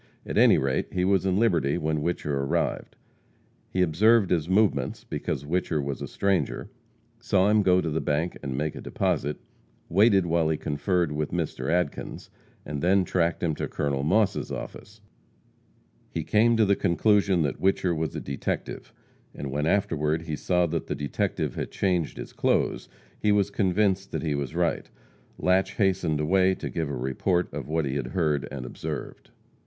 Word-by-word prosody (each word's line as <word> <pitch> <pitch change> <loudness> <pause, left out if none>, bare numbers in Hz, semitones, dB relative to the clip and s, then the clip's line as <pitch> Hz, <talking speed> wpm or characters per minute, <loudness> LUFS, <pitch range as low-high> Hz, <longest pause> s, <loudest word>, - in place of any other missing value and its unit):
At - - -5
any - - +6
rate, 65 0 0
he 90 0 0
was 95 -1 +2
in 95 0 +1
Liberty 85 -11 +2
when 80 -2 -1
Whicher 75 -2 -2
arrived. 70 0 -1 0.7
He 95 - +1
observed 100 +5 +4
his 85 -2 +1
movements, 95 -10 +1
because 65 - -4
Whicher 85 0 0
was 70 -1 -3
a - - -4
stranger; 100 -2 -1 0.5
saw 95 +1 +2
him 105 0 +4
go 90 -2 +4
to 85 - -2
the 80 - -1
bank 80 +4 -1
and 65 -2 -4
make 75 +1 -1
a - - -8
deposit; 75 +1 -1 0.5
waited 100 0 +4
while 85 -1 +1
he 80 - 0
conferred 80 +3 0
with 75 0 -2
Mr. 80 -6 -3
Adkins, 85 -3 -2 0.3
and 70 -1 -4
then, 95 +2 +3
tracked 85 -2 0
him 80 -2 +1
to - - -3
Col. 70 -2 -2
Moss' 95 +7 +1
office. 105 +1 -8 1.1
He - - -3
came 115 +2 +3
to 110 - +4
the 100 0 +3
conclusion 95 0 +2
that 70 - -3
Whicher 95 -2 +2
was 80 -1 -3
a - - -2
detective; 70 0 -4 0.4
and 70 -2 -5
when 75 +3 -1
afterward 80 -5 +1
he 80 -2 -3
saw 90 +3 +1
that 85 -1 -3
the - - -2
detective 70 -2 -2
had - - -4
changed 90 -5 -1
his - - -8
clothes, - - 0 0.3
he 105 - +2
was 100 -1 +2
convinced 95 0 +1
that - - -2
he 75 -3 0
was 70 -3 -3
right. - - 0 0.5
Latche 95 +2 +1
hastened 95 -7 +1
away 95 +4 +3
to - - -6
give 80 -3 -2
a 70 - -3
report 65 +8 -1
of - - -5
what 80 0 0
he 70 +1 -2
had 65 - -3
heard 75 -2 0
and 65 -3 -6
observed. - - -6
85 Hz, 175 wpm, -26 LUFS, 75-95 Hz, 1.1 s, any